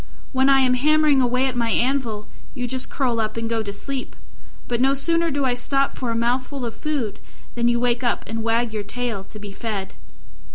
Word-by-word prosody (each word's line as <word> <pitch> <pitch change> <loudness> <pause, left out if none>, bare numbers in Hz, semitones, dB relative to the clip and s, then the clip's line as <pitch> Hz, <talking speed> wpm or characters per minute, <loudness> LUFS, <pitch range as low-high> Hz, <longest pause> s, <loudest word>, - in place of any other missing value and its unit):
When 265 0 +3
I 270 -1 +6
am 255 -1 +4
hammering 300 +1 +4
away 250 +1 +2
at 260 -2 -1
my 235 -1 +1
anvil, 235 -4 0 0.3
you 250 -2 -2
just 255 +1 -2
curl 245 -4 0
up 220 0 -1
and 230 0 -1
go 225 -1 0
to 205 -2 -4
sleep: 265 +5 -5 0.5
but 240 0 0
no 270 +1 +4
sooner 335 +4 +2
do 285 -2 0
I 250 - +2
stop 275 +3 0
for 250 - -3
a 230 - 0
mouthful 250 +3 0
of 230 - -4
food 265 -6 -3 0.3
than 235 0 +1
you 240 0 +3
wake 245 0 +1
up 240 - +1
and 225 0 -3
wag 230 0 +1
your 215 - -1
tail 230 -2 -3
to 215 - -9
be 205 -1 -8
fed." 200 -2 -4
245 Hz, 215 wpm, -23 LUFS, 230-270 Hz, 0.5 s, I